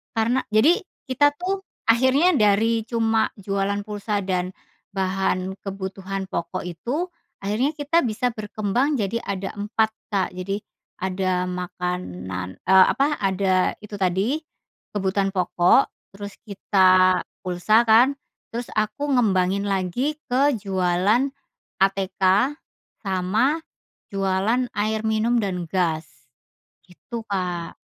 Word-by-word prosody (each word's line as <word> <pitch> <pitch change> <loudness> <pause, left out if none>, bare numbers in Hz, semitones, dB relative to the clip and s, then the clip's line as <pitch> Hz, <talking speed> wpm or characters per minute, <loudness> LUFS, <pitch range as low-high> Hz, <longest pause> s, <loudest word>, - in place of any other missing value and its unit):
Karena 230 +4 +2 0.2
jadi 300 +11 +5 0.3
kita 290 +3 +3
tuh 385 +2 -2 0.2
akhirnya 260 +9 +4
dari 220 0 +3
cuma 225 -2 +2 0.2
jualan 200 +1 -1
pulsa 205 -1 -3
dan 185 0 -2 0.4
bahan 190 0 0
kebutuhan 195 0 -5
pokok 170 +2 -3
itu, 250 - -3 0.3
akhirnya 220 +8 +1
kita 295 +3 +2
bisa 245 +2 0
berkembang 215 +6 -1
jadi 210 +3 -1
ada 195 -1 -3
4, 220 +1 +1 0.2
Kak, 195 -2 +1
jadi 195 +3 -4 0.4
ada 185 -1 0
makanan 180 - -4
eee, 190 +1 +7
apa, 290 +2 +1
ada 190 -1 +1
itu 210 -1 -8
tadi 195 - +1 0.6
kebutuhan 195 0 0
pokok, 180 +6 +3 0.2
terus 205 0 -7
kita 185 -2 +4 0.2
pulsa 185 +5 +3
kan, 245 +6 +6 0.4
terus 235 +1 -4
aku 215 +7 -1
ngembangin 195 -5 +2
lagi 200 - -1
ke 275 +2 +3
jualan 195 +6 +1 0.5
ATK 195 -1 0 0.9
sama 200 - +1 0.5
jualan 195 +5 +1
air 215 +1 0
minum 220 +2 +2
dan 185 -5 -2
gas 165 -4 0 0.8
gitu, 230 +6 -8
Kak. 180 -3 -3
200 Hz, 110 wpm, -23 LUFS, 185-230 Hz, 0.9 s, eee